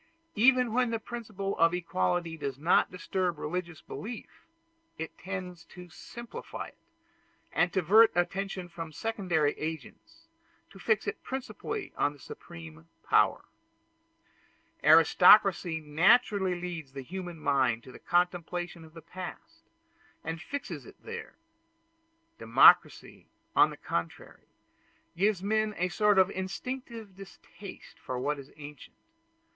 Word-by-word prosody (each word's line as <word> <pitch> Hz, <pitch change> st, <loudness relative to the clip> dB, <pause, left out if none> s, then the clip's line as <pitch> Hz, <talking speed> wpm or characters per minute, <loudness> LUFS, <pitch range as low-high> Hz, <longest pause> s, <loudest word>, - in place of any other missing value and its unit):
Even 250 Hz, +1 st, +4 dB
when 250 Hz, 0 st, +2 dB
the 230 Hz, -, -1 dB
principle 215 Hz, -4 st, -5 dB
of 165 Hz, +1 st, +4 dB
equality 165 Hz, -, -1 dB
does 140 Hz, -4 st, -5 dB
not 160 Hz, +5 st, +3 dB
disturb 180 Hz, -1 st, -2 dB
religious 175 Hz, +2 st, -4 dB
belief, 225 Hz, +2 st, -9 dB, 0.5 s
it 160 Hz, +1 st, -6 dB
tends 180 Hz, -2 st, -6 dB
to 180 Hz, -1 st, -13 dB
simplify 235 Hz, +7 st, -8 dB
it, -, -, -27 dB, 0.7 s
and 175 Hz, 0 st, +2 dB
to 190 Hz, -, +1 dB
divert 215 Hz, +7 st, +6 dB
attention 190 Hz, +1 st, -2 dB
from 165 Hz, -2 st, -8 dB
secondary 175 Hz, -5 st, 0 dB
agents, 160 Hz, -, -7 dB, 0.4 s
to 195 Hz, -, -14 dB
fix 215 Hz, +2 st, +1 dB
it -, -, -4 dB
principally 315 Hz, -, -5 dB
on 145 Hz, -, +1 dB
the 145 Hz, -, -18 dB
Supreme 165 Hz, +1 st, -11 dB, 0.2 s
Power. -, -, +3 dB, 1.4 s
Aristocracy 175 Hz, +2 st, +6 dB
naturally 185 Hz, +4 st, +3 dB
leads 170 Hz, -6 st, -6 dB
the 135 Hz, -1 st, -6 dB
human 175 Hz, +3 st, -7 dB
mind 130 Hz, -6 st, +1 dB
to 130 Hz, -, -12 dB
the -, -, -13 dB
contemplation 175 Hz, -1 st, -1 dB
of 160 Hz, 0 st, -16 dB
the 165 Hz, -, -11 dB
past, 185 Hz, -, -9 dB, 0.6 s
and 165 Hz, +1 st, -4 dB
fixes 280 Hz, +8 st, -6 dB
it -, -, -13 dB
there. 465 Hz, +1 st, -8 dB, 1.0 s
Democracy, -, -, +4 dB, 0.3 s
on 155 Hz, -, +6 dB
the 150 Hz, -, -9 dB
contrary, 85 Hz, -, -5 dB, 0.7 s
gives 195 Hz, +1 st, +1 dB
men 215 Hz, +1 st, 0 dB
a 180 Hz, +1 st, 0 dB
sort 210 Hz, +2 st, +3 dB
of 190 Hz, 0 st, +5 dB
instinctive 220 Hz, +2 st, -6 dB
distaste 195 Hz, 0 st, -12 dB
for 130 Hz, -, -5 dB
what 145 Hz, +3 st, -1 dB
is 140 Hz, 0 st, -12 dB
ancient. 145 Hz, -2 st, -11 dB
180 Hz, 125 wpm, -29 LUFS, 160-210 Hz, 1.4 s, divert